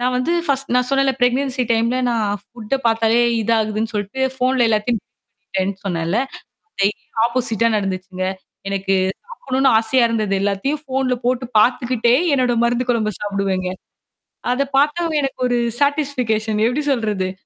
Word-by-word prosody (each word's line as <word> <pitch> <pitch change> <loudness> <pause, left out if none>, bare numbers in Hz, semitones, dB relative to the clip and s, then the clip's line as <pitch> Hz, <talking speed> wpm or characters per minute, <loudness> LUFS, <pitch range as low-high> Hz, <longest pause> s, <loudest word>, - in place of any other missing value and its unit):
நான் 250 +1 0
வந்து 255 +7 0 0.2
பர்ஸ்ட் 275 -2 -1
நான் 250 0 +3
சொன்னேன்ல, 275 0 +3
ப்ரெக்னன்சி 255 +1 +1
டைம்ல 230 +2 +1
நான் 210 -3 0 0.2
புட்ட 225 +1 -3
பார்த்தாலே 225 +1 +3 0.2
இதாதுன்னு 220 0 0
சொல்ட்டு 205 +5 -3
ஃபோன்ல 255 -1 +2
எல்லாத்தையும் 220 +1 +1
அனுப்பிட்டேன்னு 190 0 -6
சொன்னேன்ல. 170 +2 -1 0.6
டெய்லி 200 +1 0 0.2
ஆப்போசிட்டா 235 -2 0
நடந்துச்சுங்க. 185 -1 -3 0.4
எனக்கு 195 0 0 0.4
சாப்பிடணுன்னு 270 - +1
ஆசையா 235 +3 +3
இருந்தது. 215 -3 0
எல்லாத்தையும் 205 +10 -1
ஃபோன்ல 260 -1 0
போட்டு 255 0 0
பார்த்துக்கிட்டே, 240 0 +3 0.2
என்னோட 250 -2 +2
மருந்து 240 +1 0
குழம்ப 215 -3 0
சாப்பிடுவேங்க. 195 -2 -1 0.8
அத 255 +3 +1
பார்த்தாவே 310 +3 +1
எனக்கு 270 - -3
ஒரு 245 0 +1 0.2
சேட்டிஸ்பிகேஷன் 250 -7 0
எப்பிடி 275 +5 -1
சொல்றது? 205 -6 -1
235 Hz, 130 wpm, -20 LUFS, 210-255 Hz, 0.8 s, நான்